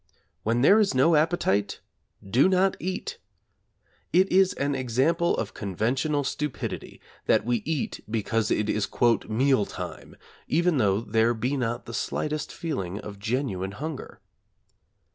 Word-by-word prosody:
When 115 +4 0
there 205 +9 +7
is 200 -9 +2
no 155 +6 +4
appetite 150 - +1 0.5
do 125 - +4
not 190 +1 +3
eat. 185 +2 -4 0.9
It 190 +2 +3
is 190 0 +4
an 140 0 -1
example 135 +7 +1
of - - -3
conventional 125 - -1
stupidity 150 0 -4 0.3
that - - +3
we 120 0 +1
eat 155 -4 -3
because 110 0 0
it 105 - +1
is 105 -1 0 0.4
'meal 125 -1 +2
time,' - - -8 0.3
even 170 -1 +2
though 100 -2 +2
there 115 +1 +1
be 125 +5 -1
not 120 -2 -2
the 115 - -8
slightest 150 +5 -2
feeling 100 - -4
of 100 -2 -9
genuine 105 -4 -2
hunger. 150 +5 -6
130 Hz, 135 wpm, -26 LUFS, 110-155 Hz, 0.9 s, there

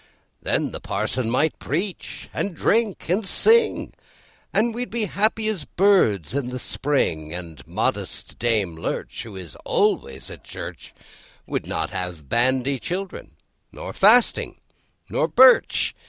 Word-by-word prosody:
Then - - 0
the - - -5
Parson 125 -3 -2
might 140 +6 +1
preach, 180 +7 -4
and 195 -4 -2
drink, 220 +3 +1
and 185 +6 +1
sing, 445 - +3 0.6
And 230 +2 +2
we'd 245 +2 -4
be 235 -1 -2
as 205 - -3
happy 215 +1 +2
as 195 -9 -2
birds 125 - +2
in 135 -3 -2
the 125 - -4
spring; 120 - -1
And 85 -5 -8
modest - - -2
Dame 105 -8 0
Lurch, 80 - -4
who 110 -4 -9
is 90 -6 -9
always 65 0 0
at - - -11
church, - - -9 0.5
Would - - -3
not - - -2
have 90 -5 -5
bandy 130 - +2
children, 185 +7 -5 0.4
nor - - -8
fasting, 220 +4 +4 0.5
nor - - 0
birch. 260 0 +5
145 Hz, 140 wpm, -23 LUFS, -, 0.6 s, birch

